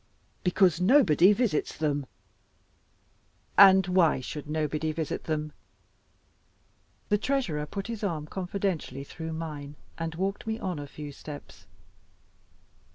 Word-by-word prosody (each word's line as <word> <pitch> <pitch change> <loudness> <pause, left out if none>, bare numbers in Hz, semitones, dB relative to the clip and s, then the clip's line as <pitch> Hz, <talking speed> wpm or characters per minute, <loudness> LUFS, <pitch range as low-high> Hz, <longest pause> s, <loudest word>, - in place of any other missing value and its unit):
"Because 180 -2 +3
nobody 190 - +6
visits 210 -7 0
them." 145 -3 -1 1.5
"And 190 -1 +8
why 180 -5 +3
should 145 +3 -7
nobody 155 0 -1
visit 155 -1 -4
them?" 155 -1 -2 1.6
The 210 - +3
Treasurer 205 - -1
put 195 +5 -5
his 230 -2 -5
arm 165 -7 -2
confidentially 180 -6 -3
through 160 +3 -7
mine, 150 -3 -6 0.2
and 165 -1 -3
walked 195 +5 -3
me 220 0 -1
on 185 -8 -3
a 145 - -6
few 145 +1 -8
steps. 145 +1 -11
165 Hz, 115 wpm, -28 LUFS, 150-195 Hz, 1.6 s, And